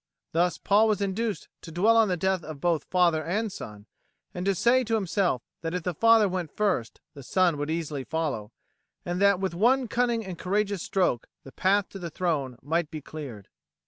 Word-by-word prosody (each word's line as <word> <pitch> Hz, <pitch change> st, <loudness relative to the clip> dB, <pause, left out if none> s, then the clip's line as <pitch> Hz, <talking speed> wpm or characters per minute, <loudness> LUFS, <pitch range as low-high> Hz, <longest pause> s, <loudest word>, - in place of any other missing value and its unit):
Thus 175 Hz, +1 st, +2 dB
was -, -, -18 dB
Paul 215 Hz, +2 st, +4 dB
induced 205 Hz, +2 st, -2 dB
to 165 Hz, -, -10 dB
dwell 205 Hz, +8 st, +3 dB
on 225 Hz, -1 st, +5 dB
the 180 Hz, -2 st, 0 dB
death 190 Hz, 0 st, 0 dB
of 155 Hz, -3 st, -8 dB
both 165 Hz, -2 st, 0 dB
father 170 Hz, -4 st, +2 dB
and 205 Hz, +7 st, -1 dB
son, 105 Hz, -, -9 dB, 0.5 s
and 180 Hz, -, -4 dB
to 195 Hz, -, +3 dB
say 245 Hz, +7 st, +3 dB
to 225 Hz, -1 st, 0 dB
himself 190 Hz, -, 0 dB, 0.2 s
that 165 Hz, +1 st, -3 dB
if 180 Hz, -, -3 dB
the 180 Hz, -, -1 dB
father 225 Hz, +4 st, +5 dB
went 180 Hz, -3 st, -3 dB
first 190 Hz, -, 0 dB
the 140 Hz, -, -10 dB
son 180 Hz, +4 st, +2 dB
would 145 Hz, +1 st, -3 dB
easily 155 Hz, -4 st, -2 dB
follow, 140 Hz, -9 st, -3 dB, 0.5 s
and 175 Hz, +2 st, -2 dB
that 200 Hz, -2 st, +5 dB
with 190 Hz, -2 st, -2 dB
one 245 Hz, +8 st, +3 dB
cunning 235 Hz, -1 st, 0 dB
and 185 Hz, -3 st, -7 dB
courageous 200 Hz, 0 st, 0 dB
stroke 180 Hz, -13 st, 0 dB, 0.2 s
the 135 Hz, -, -12 dB
path 195 Hz, +5 st, +2 dB
to 195 Hz, -, -9 dB
the 170 Hz, -2 st, -5 dB
throne 150 Hz, -7 st, -2 dB
might 160 Hz, +2 st, 0 dB
be 155 Hz, -, -6 dB
cleared. 135 Hz, -10 st, -9 dB
180 Hz, 200 wpm, -27 LUFS, 155-205 Hz, 0.5 s, on